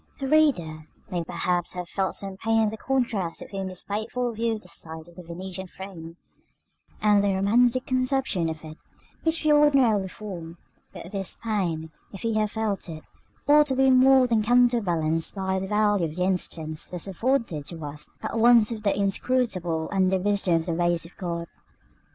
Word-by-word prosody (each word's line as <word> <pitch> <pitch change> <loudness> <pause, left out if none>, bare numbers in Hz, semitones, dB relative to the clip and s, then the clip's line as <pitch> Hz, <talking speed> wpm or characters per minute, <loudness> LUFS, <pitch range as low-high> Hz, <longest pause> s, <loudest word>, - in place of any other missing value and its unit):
§ - - -38
VII. 275 - -4
The 285 +3 +3
reader 170 - +1 0.2
may 175 -2 -1
perhaps 175 +1 -1
have 180 -1 -5
felt 190 +1 -1
some 195 -1 -5
pain 225 +3 +1
in 215 - +2
the 220 - -5
contrast 230 -10 -1
between 195 -1 -5
this 185 -1 -7
faithful 220 +4 -2
view 225 +1 0
of 215 - -9
the - - -13
site 160 -2 -7
of 170 - -16
the 180 - -9
Venetian 185 +2 -7
Throne, 175 -3 -9 0.9
and 205 -1 +5
the 200 -1 +2
romantic 240 +6 +3
conception 255 -9 0
of 160 0 -7
it 155 0 -10 0.4
which 325 -1 -1
we 305 - +5
ordinarily 270 -9 +4
form; 180 -4 -8 0.3
but 175 - -10
this 195 -2 -4
pain, 175 -8 -1 0.2
if 195 - -9
he 230 -1 -1
have 215 -1 +1
felt 210 -4 -3
it, 155 -1 -8 0.4
ought 295 +1 +6
to 265 - 0
be 265 0 +4
more 260 0 +6
than 230 -3 +2
counterbalanced 210 -10 +2
by 190 -1 -1
the 190 - -4
value 205 -3 +2
of 155 -1 -6
the 180 - 0
instance 165 -4 -2
thus 180 -2 -6
afforded 200 - -1
to 165 -3 -6
us 150 +1 -8
at 230 - -2
once 235 -1 +6
of 220 -2 -4
the 205 - +2
inscrutableness 195 -6 0
and 190 -1 +2
the 190 - +3
wisdom 195 -2 +1
of 165 -1 0
the 170 - -1
ways 175 0 +1
of 170 - -14
God. 170 -2 -4
195 Hz, 190 wpm, -25 LUFS, 170-230 Hz, 0.9 s, ought